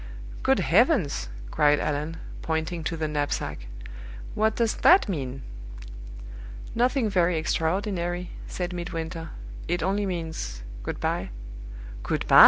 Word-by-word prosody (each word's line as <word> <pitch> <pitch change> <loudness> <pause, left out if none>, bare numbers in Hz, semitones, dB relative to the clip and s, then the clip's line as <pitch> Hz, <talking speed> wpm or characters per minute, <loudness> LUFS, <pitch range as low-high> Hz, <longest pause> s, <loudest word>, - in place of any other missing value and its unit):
"Good - - +3
heavens!" - - +3 0.2
cried 150 -1 +4
Allan, 150 +2 -1 0.2
pointing 160 +1 -1
to 165 - -1
the 155 -1 0
knapsack, 145 - -2 0.7
"what 220 +1 +2
does 230 -2 +1
that 365 -5 +7
mean?" 135 -8 -3 1.3
"Nothing 245 +1 +3
very 180 -4 +3
extraordinary," 175 +2 0 0.2
said 180 -1 -3
Midwinter. 165 -2 -4 0.4
"It 175 -1 0
only 200 +2 +1
means 160 - -4 0.2
good - - -4
by." - - -1 0.7
"Good - - -1
by!" - - +9
165 Hz, 115 wpm, -27 LUFS, 155-190 Hz, 1.3 s, by